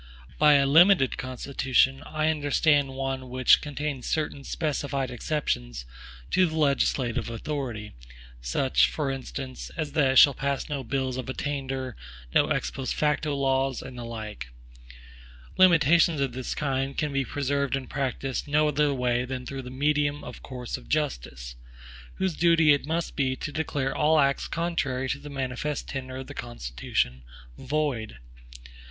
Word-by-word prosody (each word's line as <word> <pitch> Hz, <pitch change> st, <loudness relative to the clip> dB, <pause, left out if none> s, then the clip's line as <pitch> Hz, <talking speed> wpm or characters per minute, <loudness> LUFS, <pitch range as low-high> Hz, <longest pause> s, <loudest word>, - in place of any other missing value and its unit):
By 150 Hz, -1 st, +7 dB
a 140 Hz, -1 st, +4 dB
limited 165 Hz, 0 st, +5 dB
Constitution, 130 Hz, +1 st, +1 dB
I 155 Hz, 0 st, 0 dB
understand 145 Hz, -2 st, +2 dB
one 135 Hz, -1 st, -3 dB
which 130 Hz, 0 st, +5 dB
contains 145 Hz, -3 st, -4 dB
certain 150 Hz, -3 st, -2 dB
specified 140 Hz, -3 st, -2 dB
exceptions 65 Hz, -, -2 dB, 0.5 s
to 185 Hz, -1 st, +4 dB
the 160 Hz, -, -5 dB
legislative 140 Hz, -5 st, +1 dB
authority; 115 Hz, -3 st, -4 dB, 0.5 s
such, 60 Hz, -, +2 dB
for 145 Hz, -3 st, -2 dB
instance, 135 Hz, 0 st, -6 dB
as 155 Hz, -3 st, -2 dB
that 140 Hz, -3 st, +3 dB
it -, -, -4 dB
shall 140 Hz, -, +9 dB
pass 140 Hz, +1 st, -2 dB
no 145 Hz, -3 st, -3 dB
bills 130 Hz, +1 st, -2 dB
of 130 Hz, -1 st, -5 dB
attainder, 135 Hz, -3 st, -3 dB, 0.4 s
no -, -, +4 dB
ex -, -, -1 dB
post 135 Hz, -1 st, -3 dB
facto 150 Hz, 0 st, 0 dB
laws, 135 Hz, -1 st, 0 dB
and 130 Hz, -, -9 dB
the 120 Hz, -, -6 dB
like. 110 Hz, -, -6 dB, 1.1 s
Limitations 170 Hz, -2 st, +5 dB
of 135 Hz, -2 st, 0 dB
this 130 Hz, 0 st, -4 dB
kind 135 Hz, -1 st, -2 dB
can 150 Hz, -3 st, -1 dB
be 135 Hz, 0 st, +1 dB
preserved 140 Hz, +1 st, -1 dB
in 135 Hz, -1 st, -4 dB
practice 135 Hz, -1 st, -3 dB
no 150 Hz, +1 st, +3 dB
other 150 Hz, 0 st, +2 dB
way 125 Hz, -1 st, +1 dB
than 125 Hz, 0 st, -5 dB
through 135 Hz, +1 st, -5 dB
the 125 Hz, -, -9 dB
medium 145 Hz, +2 st, 0 dB
of -, -, -9 dB
courts 125 Hz, -2 st, -6 dB
of -, -, -15 dB
justice, 60 Hz, -, -2 dB, 0.6 s
whose 190 Hz, -2 st, -1 dB
duty 165 Hz, -2 st, +5 dB
it 145 Hz, 0 st, -1 dB
must 165 Hz, +1 st, -2 dB
be 130 Hz, -2 st, +1 dB
to 145 Hz, -, -5 dB
declare 145 Hz, -3 st, -2 dB
all 155 Hz, +1 st, +3 dB
acts 140 Hz, -1 st, +2 dB
contrary 140 Hz, -6 st, -1 dB
to 140 Hz, -, -2 dB
the 145 Hz, -, -9 dB
manifest 135 Hz, +1 st, -3 dB
tenor 130 Hz, -1 st, -5 dB
of 130 Hz, -, -6 dB
the 145 Hz, -, -9 dB
Constitution 65 Hz, -, -3 dB, 0.3 s
void. 135 Hz, -, -2 dB
135 Hz, 155 wpm, -27 LUFS, 130-150 Hz, 1.1 s, shall